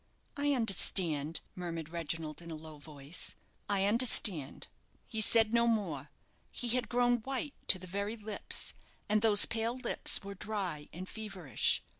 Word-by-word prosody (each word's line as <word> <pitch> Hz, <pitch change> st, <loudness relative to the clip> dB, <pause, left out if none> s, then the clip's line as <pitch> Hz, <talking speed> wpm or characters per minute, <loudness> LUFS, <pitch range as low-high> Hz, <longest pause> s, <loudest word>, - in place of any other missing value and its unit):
"I 285 Hz, 0 st, +1 dB
understand," 170 Hz, -, +1 dB
murmured 165 Hz, -3 st, -5 dB
Reginald, 165 Hz, -1 st, -4 dB
in 170 Hz, -, -10 dB
a 160 Hz, -, -5 dB
low 155 Hz, -1 st, -9 dB
voice; 145 Hz, +1 st, -7 dB, 0.3 s
"I 195 Hz, -1 st, +2 dB
understand." 205 Hz, -, +3 dB, 0.4 s
He 220 Hz, -2 st, -2 dB
said 225 Hz, 0 st, +5 dB
no 235 Hz, 0 st, +4 dB
more. 170 Hz, -, -1 dB, 0.4 s
He 245 Hz, -, -2 dB
had 250 Hz, +1 st, +1 dB
grown 245 Hz, 0 st, +3 dB
white 270 Hz, +5 st, -3 dB
to -, -, +6 dB
the 185 Hz, -, -9 dB
very 200 Hz, +4 st, -3 dB
lips; 215 Hz, -1 st, -2 dB, 0.3 s
and 210 Hz, 0 st, +2 dB
those 215 Hz, -2 st, +6 dB
pale 230 Hz, +2 st, -2 dB
lips 250 Hz, -5 st, +3 dB
were 200 Hz, 0 st, -6 dB
dry 195 Hz, -7 st, -4 dB
and 185 Hz, +3 st, -7 dB
feverish. 195 Hz, -, 0 dB
200 Hz, 150 wpm, -33 LUFS, 165-225 Hz, 0.4 s, to